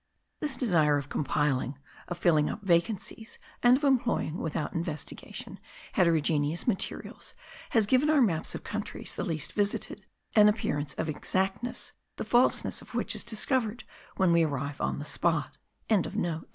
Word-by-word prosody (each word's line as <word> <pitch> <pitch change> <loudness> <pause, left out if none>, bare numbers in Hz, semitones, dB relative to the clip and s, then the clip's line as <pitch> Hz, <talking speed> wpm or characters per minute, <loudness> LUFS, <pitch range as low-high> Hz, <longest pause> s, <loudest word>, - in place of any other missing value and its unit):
This 295 -4 -1
desire 165 - +3
of 140 0 -5
compiling, 140 -2 0 0.3
of 175 - -4
filling 155 -4 +3
up 210 - -6
vacancies, 195 +4 0 0.2
and 245 +1 +6
of 290 - -9
employing, 245 - +1
without 155 -1 -3
investigation, 160 -3 -5 0.3
heterogeneous 160 -2 +2
materials, 220 -6 -3 0.3
has 225 -3 +3
given 260 +7 +3
our 310 -2 +5
maps 180 -11 +1
of - - -7
countries 210 0 -4
the - - -3
least 160 -3 -3
visited 205 -1 -1 0.3
an 210 -1 +7
appearance 145 -9 -1
of - - -2
exactness, 190 +8 -2 0.2
the - - -4
falsity 245 +1 +3
of - - -13
which - - +1
is - - -1
discovered 235 0 0 0.3
when 185 -2 +4
we 170 0 +5
arrive 140 -2 -2
on - - 0
the 145 - -5
spot.) 160 -1 0
175 Hz, 145 wpm, -29 LUFS, 150-225 Hz, 0.3 s, an